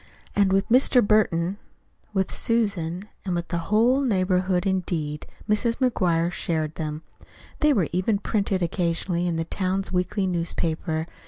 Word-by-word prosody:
And 200 -2 +3
with 195 +1 +2
Mr. 250 -1 +5
Burton, 195 -3 +2 0.5
with 195 -2 -1
Susan, 200 -5 -1 0.2
with 175 -3 -2
the 170 - -1
whole 235 +6 +4
neighborhood 185 -5 +1
indeed, 170 -6 -2 0.2
Mrs. 230 +2 +1
McGuire 180 -10 +1
shared 160 -3 -2
them. 155 -1 -5 0.6
They 300 -1 +4
were 195 - +2
even 185 +4 +1
printed 200 -3 -1
occasionally 175 0 0
in 170 - -1
the 165 - -1
town's 190 +2 -2
weekly 190 +2 0
newspaper. 165 -2 -1
185 Hz, 135 wpm, -25 LUFS, 170-205 Hz, 0.6 s, Mr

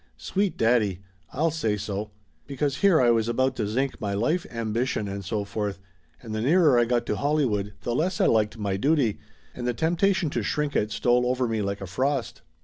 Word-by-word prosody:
Sweet 195 - -1
daddy! 110 -5 +2 0.3
I'll 160 +4 +1
say 110 -9 -1
so! 105 +1 -4 0.4
Because 140 0 -1
here 195 -5 +4
I 120 -2 +5
was 115 -1 +1
about 130 +3 +1
to 105 - -1
zinc 130 +6 -2
my 100 -1 -2
life 155 - 0
ambition 115 -1 -2
and 100 0 -5
so 105 +2 -2
forth, 100 -1 -3 0.4
and 110 -2 -6
the 110 - -2
nearer 150 -1 +4
I 120 - +4
got 120 0 0
to - - -1
Hollywood 120 -9 0
the 120 - -1
less 170 +9 0
I - - +4
liked 110 0 +2
my 100 -3 -2
duty, 140 -3 +1 0.3
and 120 0 -5
the 120 - 0
temptation 175 - +1
to 120 - -1
shrink 145 +7 -1
it 105 - +1
stole 125 +2 +2
over 125 0 0
me 110 -2 -1
like 100 0 -3
a - - -4
frost. 130 +7 -2
120 Hz, 205 wpm, -25 LUFS, 105-140 Hz, 0.4 s, I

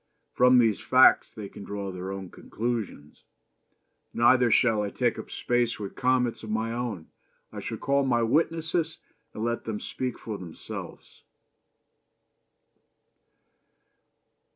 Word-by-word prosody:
From 125 0 +5
these 115 -4 +3
facts - - +5
they 105 -2 -8
can 100 - -11
draw 100 -1 -5
their 90 +1 -6
own 95 -2 -7
conclusions. 110 -10 -5 0.9
Neither 120 +1 +5
shall 115 -2 +3
I 105 - -2
take 120 +2 0
up - - -8
space 120 -1 0
with 100 -2 -6
comments 125 -2 +1
of 110 - -8
my 110 +1 -1
own. 115 -9 -4 0.4
I - - -6
shall - - -5
call 140 0 +1
my 120 -3 +2
witnesses 160 +5 0 0.4
and 110 - -4
let 120 0 -2
them 110 -2 -3
speak 130 -2 -4
for 110 -3 -6
themselves. 85 -3 -9
115 Hz, 130 wpm, -27 LUFS, 105-125 Hz, 0.9 s, From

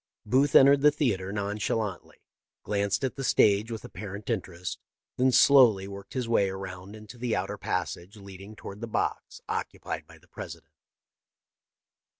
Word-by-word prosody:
" - - -64
Booth 130 +6 +2
entered 140 +1 +7
the 150 - +7
theatre 100 -11 -1
nonchalantly, 105 -1 -3 0.4
glanced 100 +3 -1
at 130 - -2
the 135 - -4
stage 105 -3 +3
with 115 -2 -6
apparent 105 +1 -6
interest, 90 -5 -4 0.4
then 130 +1 +3
slowly 120 -8 +6
worked 100 0 -10
his 125 -3 -2
way 100 -4 +2
around 95 +1 -7
into 110 +3 -12
the 120 -2 -1
outer 95 +3 -2
passage 90 +3 -4
lead 100 -2 -11
ing 105 +2 -11
toward 100 0 -9
the 115 - -4
box 110 - -3
occupied - - -4
by - - -15
the - - -25
President. - - -10
105 Hz, 155 wpm, -28 LUFS, 95-120 Hz, 0.4 s, entered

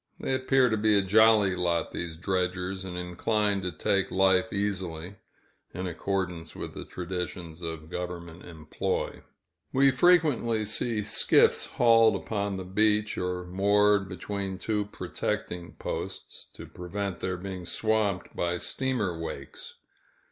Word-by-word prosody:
They - - -1
appear 130 0 +3
to 110 -2 +1
be 105 0 +4
a 100 - +3
jolly 105 -1 +5
lot, 85 -2 0
these 85 -2 -5
dredgers, 95 +1 -1
and 90 -1 -6
inclined 100 +3 0
to 90 -1 -2
take 95 +4 0
life 95 +2 +3
easily, 95 -3 -3 0.6
in 90 +2 -3
accordance 90 -2 -3
with - - -6
the - - -7
traditions 90 -2 -5
of 80 -1 -6
government 90 -1 -6
employ. 80 -3 -3 0.5
We 135 +1 +5
frequently 130 -8 +3
see 110 +1 0
skiffs 105 - +3
hauled 115 -3 +5
upon 100 -1 -2
the 95 - -6
beach, 105 +2 +2
or 90 0 -3
moored 100 +2 +3
between 95 0 -4
two 105 +2 -1
protecting 90 -3 -4
posts, - - -6
to - - -9
prevent 95 +1 -5
their 95 -1 -2
being 95 -1 -6
swamped 110 -4 0
by 85 0 0
steamer 105 -6 -1
wakes. 70 -4 -7
95 Hz, 135 wpm, -28 LUFS, 90-105 Hz, 0.6 s, jolly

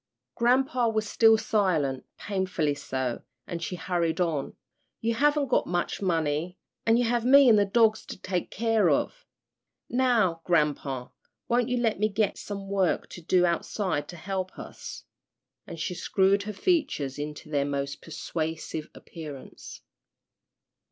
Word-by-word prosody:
Grampa 250 0 +2
was 215 -1 -1
still 225 +1 +5
silent, 180 - 0
painfully 185 -7 -1
so, 130 -3 -3 0.2
and 170 -1 -5
she 175 +2 -3
hurried 170 -1 -1
on, 160 -6 -1 0.4
"You 230 +1 0
haven't 290 +2 +2
got - - +2
much 175 +2 -2
money, 165 -1 0 0.3
an' 225 +1 +5
you 245 - +3
have 240 0 +1
me 275 +2 +7
an' 230 - +7
the 205 -1 +4
dogs 220 +1 +3
to - - -7
take 185 -1 -3
care 225 0 +2
of. - - -1 0.6
Now, 230 -10 +2
grampa, 145 -6 0 0.4
won't 240 0 +2
you 250 - +1
let 225 -4 +1
me 215 +1 +2
get 210 0 0
some 200 -1 -6
work 195 -3 0
to 175 - -9
do 180 +2 +3
outside 170 -2 -1
to 175 - -9
help 185 +2 -4
us?" - - -8 0.6
and 165 - -8
she 180 - -2
screwed 195 +2 +2
her - - -1
features 195 - 0
into 150 +2 -6
their 140 -2 +2
most 140 0 -3
persuasive 160 -1 -4
appearance. 150 -5 -10
185 Hz, 145 wpm, -27 LUFS, 160-225 Hz, 0.6 s, me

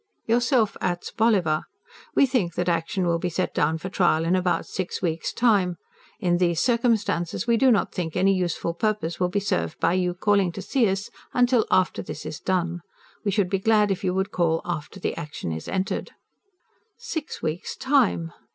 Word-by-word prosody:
YOURSELF 235 -1 +2
ATS. 175 -1 -2
BOLLIVER. 190 -9 +2 0.5
WE - - +6
THINK 225 - 0
THAT 175 0 -1
ACTION 170 +2 0
WILL 170 -1 +1
BE 180 - -1
SET 180 +2 -2
DOWN 155 +2 +1
FOR 180 +4 -6
TRIAL 170 -4 +2
IN 175 +2 +2
ABOUT 180 -1 +1
SIX 185 -2 -4
WEEKS' 165 -2 -1
TIME. 200 -7 +2 0.4
IN 175 -4 +2
THESE 170 -2 +2
CIRCUMSTANCES 230 -7 +1
WE 235 -1 +3
DO 265 +2 +4
NOT 215 -6 +2
THINK 165 -3 -3
ANY 195 +1 +4
USEFUL 175 -2 -1
PURPOSE 205 -3 -1
WILL 180 -1 +1
BE 205 +3 0
SERVED 85 - -2
BY - - +2
YOU 180 -1 +1
CALLING 200 -1 +2
TO 195 - -6
SEE 225 +1 +2
US 195 +2 -3 0.2
UNTIL 245 -2 +3 0.4
THIS - - -7
IS 150 - -5
DONE. 175 -2 -1 0.4
WE 210 - 0
SHOULD 195 -2 +1
BE 195 - +1
GLAD 210 0 +3
IF 195 - -2
YOU 185 -1 0
WOULD 190 +1 -1
CALL 165 -2 +1
AFTER 175 +2 -5
THE - - -2
ACTION 150 - -5
IS 80 0 -5
ENTERED. 190 0 -2 0.9
Six 405 -11 -5
weeks' 160 +2 -3
time? 235 - +1
185 Hz, 185 wpm, -25 LUFS, 170-215 Hz, 0.9 s, WE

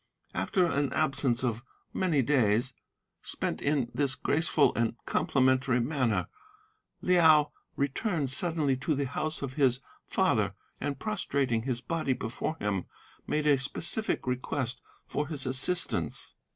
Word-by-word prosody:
After 185 -4 +1
an 145 -4 0
absence 135 -5 +1
of 120 -2 -1 0.3
many 165 -8 +2
days, 120 -2 +2 0.5
spent - - -3
in 140 -5 0
this 140 -3 +1
graceful 155 0 +2
and 115 0 0
complimentary 130 -1 +2
manner, 125 -2 0 0.8
Liao 160 -5 +5 0.2
returned 140 - -1
suddenly 155 -2 +1
to 145 +4 -1
the 140 0 -1
house 155 +3 -3
of 130 -2 -4
his 130 -3 +2 0.3
father, - - +1 0.2
and, 140 -2 -3
prostrating 140 - 0
his 120 0 -2
body 155 +1 -1
before 120 +5 -3
him, 100 - -2 0.4
made 150 0 0
a 145 -3 +4
specific 165 +10 -2
request 125 0 -2 0.2
for 150 0 -2
his 145 -3 -1
assistance. 135 +8 +1
140 Hz, 125 wpm, -29 LUFS, 125-155 Hz, 0.8 s, Liao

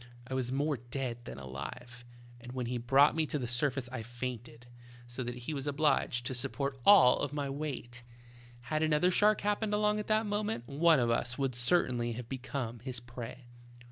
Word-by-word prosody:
I 130 - -6
was 130 -1 -1
more 145 +2 0
dead 120 0 -5
than - - -7
alive, 70 - -8 0.3
and 125 +1 -10
when 130 -1 -3
he 120 +1 -2
brought 135 +6 +5
me 160 -1 +1
to 150 - -1
the 125 -4 -3
surface 125 +2 0
I 130 -3 -4
fainted, 120 0 -6 0.4
so 120 +2 -6
that 120 0 -4
he 155 - -3
was 140 0 -4
obliged 145 -4 +1
to 130 - -2
support 135 +1 -2
all 145 -7 +7
my 145 -2 -3
weight. 135 -4 -5 0.6
Had 155 +6 -2
another 160 +3 +3
shark 210 +3 +4
happened 210 +1 0
along 210 0 +2
at 210 - -5
that 215 +1 +2
moment, 205 - -2
one 155 +2 +4
of 120 -1 +2
us 120 +1 0
would 135 -2 0
certainly 120 -2 +1
have 120 0 -7
become 130 -2 -4
his 125 +1 -4
prey. 120 +1 -9
130 Hz, 185 wpm, -32 LUFS, 120-150 Hz, 0.6 s, all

